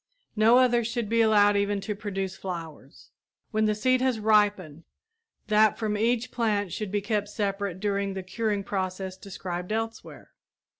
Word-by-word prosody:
No 225 +3 +5
others 240 -3 +3
should 230 -2 -3
be 230 0 +3
allowed 205 -2 +5
even 200 0 +1
to 210 +2 -3
produce 195 -2 -4
flowers. 165 -7 -8 0.4
When 215 -1 +1
the 215 0 +1
seed 255 +4 +2
has 255 -3 +1
ripened, 205 -7 +2 0.6
that 215 0 +3
from 215 -2 -1
each 235 +3 0
plant 205 -6 -1
should 210 -3 -4
be 205 0 0
kept 205 0 -1
separate 200 -3 -3
during 200 -1 -1
the 190 - -4
curing 205 +1 -2
process 190 -1 -3
described 185 -1 -6
elsewhere. 225 +1 -5
205 Hz, 155 wpm, -27 LUFS, 195-220 Hz, 0.6 s, No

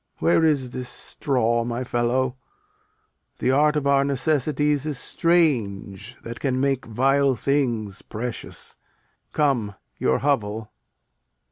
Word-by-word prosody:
Where 85 - +3
is 140 -6 +2
this 125 0 -5
straw, 120 -5 0
my 120 +1 -3
fellow? 125 +1 0 1.0
The 130 - +1
art 150 +3 +3
of 150 -2 0
our 140 0 +4
necessities 145 +1 +1
is 150 -3 -1
strange, 120 - 0
That 115 0 -7
can 130 -2 0
make 135 -2 0
vile 135 +4 +2
things 120 -6 -1
precious. 115 +2 -6 0.5
Come, 120 -9 +1 0.2
your 65 - +2
hovel. 110 -6 -1
130 Hz, 115 wpm, -24 LUFS, 115-140 Hz, 1.0 s, our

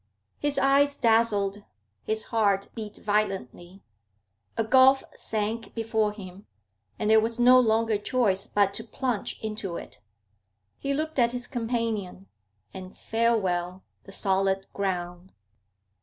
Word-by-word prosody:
His 290 -1 -1
eyes 280 +1 +3
dazzled; 215 -3 +2 0.4
his 220 0 -2
heart 200 -3 +2
beat 215 -2 -7
violently. 195 - -3 0.7
A 225 - +2
gulf 260 +3 +5
sank 220 +1 -4
before 220 -2 0
him, 195 -2 -11 0.5
and 210 - -2
there 220 - +7
was 230 +2 -2
no 250 +1 +7
longer 225 -2 +2
choice 205 -4 0
but 200 -1 +2
to 225 - -4
plunge 240 -2 -3
into 210 -5 -4
it. - - -10 0.8
He 275 - -2
looked 310 -1 -2
at 235 0 +3
his 245 0 -4
companion, 225 -6 -3 0.5
and 185 0 -9
farewell 190 -6 0 0.2
the 195 - -11
solid 195 0 0
ground. 180 -2 -4
215 Hz, 125 wpm, -26 LUFS, 195-235 Hz, 0.8 s, there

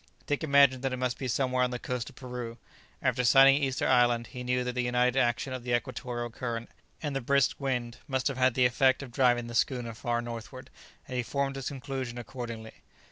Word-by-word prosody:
Dick 145 +2 -1
imagined 140 -3 +5
that 135 -1 -1
it - - -2
must 125 -1 -2
be 130 - -3
somewhere 130 0 +1
on 125 - +1
the 125 - -3
coast 125 0 -4
of 135 - -18
Peru; 125 -3 -6 0.5
after 125 - +1
sighting 135 +3 +7
Easter 135 -1 0
Island, 120 -2 +3
he 125 +3 -8
knew 125 0 0
that 125 0 -3
the 125 - 0
united 125 +1 +2
action 125 +2 0
of 130 -2 -5
the 120 -1 +1
equatorial 120 0 -4
current 115 -1 -5 0.3
and 145 -2 -2
the 135 - -1
brisk 140 +2 +2
wind 120 -3 -2
must 130 -2 0
have 135 -2 -2
had 130 -2 +3
the 125 - +4
effect 130 +3 +3
of 130 - -9
driving 120 -1 +3
the 120 - -7
schooner 120 -1 0
far 120 +2 -1
northward, 120 +3 -7 0.4
and 130 - -4
he - - +2
formed 140 +2 -2
his 135 -2 -4
conclusion 135 -3 -5
accordingly. 115 -2 -7
125 Hz, 215 wpm, -29 LUFS, 120-135 Hz, 0.5 s, sighting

